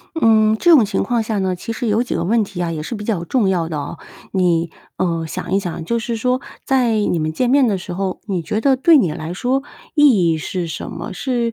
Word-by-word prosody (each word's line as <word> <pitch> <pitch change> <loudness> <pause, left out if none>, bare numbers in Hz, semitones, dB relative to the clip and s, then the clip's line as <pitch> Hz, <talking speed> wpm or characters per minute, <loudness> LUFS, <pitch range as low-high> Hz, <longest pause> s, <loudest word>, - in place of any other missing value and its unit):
嗯， 220 -5 +4
这 345 - +3
种 270 -9 +7
情 200 -1 -1
况 240 -2 0
下 220 -1 -2
呢， 190 -1 0
其 180 +6 -6
实 235 - -4
有 220 +2 +2
几 250 - -4
个 - - -1
问 220 +5 +2
题 195 -3 -4
啊， 170 - -2
也 155 -2 -4
是 200 - -5
比 210 -1 -6
较 205 -6 -1
重 210 +2 +1
要 175 -4 0
的 160 - -4
哦。 145 +3 -6 0.3
你， 170 -3 +1 0.3
呃， 165 -3 -1
想 165 - -5
一 195 - +3
想 170 -4 -5
就 235 +6 0
是 235 0 -3
说， 250 +3 0 0.2
在 255 -4 +2
你 205 -5 +1
们 155 0 -1
见 245 +9 0
面 275 -1 +5
的 200 - +1
时 180 0 -7
候， 190 0 -3
你 185 -5 -2
觉 210 +7 -2
得 270 +1 +3
对 320 +5 +5
你 175 -10 +1
来 160 +2 -5
说， 260 +6 0 0.3
意 250 - +5
义 - - 0
是 175 +2 -3
什 160 - -6
么？ 170 +3 -6
是 240 +1 -1
205 Hz, 270 characters per minute, -19 LUFS, 175-235 Hz, 0.3 s, 种